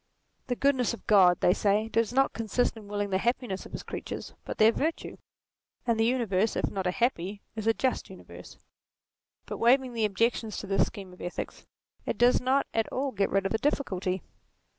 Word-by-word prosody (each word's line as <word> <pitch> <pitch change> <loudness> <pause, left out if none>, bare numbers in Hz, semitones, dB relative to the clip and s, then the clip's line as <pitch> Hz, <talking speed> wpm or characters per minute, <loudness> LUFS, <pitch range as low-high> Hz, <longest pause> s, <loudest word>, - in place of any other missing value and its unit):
The 250 - 0
goodness 255 -3 +2
of - - -20
God, 185 -5 +5
they 180 - +5
say, 210 +2 +1
does 225 0 +1
not 270 +2 +2
consist 230 +2 0
in 215 -2 -11
willing 205 -1 -2
the 190 - +3
happi 245 +3 0
ness 190 -2 -5
of - - -19
his - - -6
creatures, - - -6
but - - -5
their 220 +1 +6
virtue; 315 +7 -3 0.7
and 230 -2 +1
the 225 - +4
uni 245 0 +1
verse, 200 +2 +1
if - - -1
not 190 -2 -2
a - - +3
happy, 200 -3 -1
is 220 0 -4
a 225 - +5
just, 260 - -1
universe. - - -12 0.9
But - - -6
waving 255 +1 +3
the 225 -2 +1
objections 220 +2 0
to - - -5
this 195 0 +2
scheme 195 -4 -9
of 180 - -14
ethics, 175 - -6 0.4
it - - -3
does 245 +1 +4
not 260 +2 +2
at 225 -1 0
all 275 +1 -1
get 200 -4 0
rid 195 0 +1
of 195 - -1
the 220 - 0
difficulty. 190 - -1
225 Hz, 205 wpm, -28 LUFS, 195-245 Hz, 0.9 s, their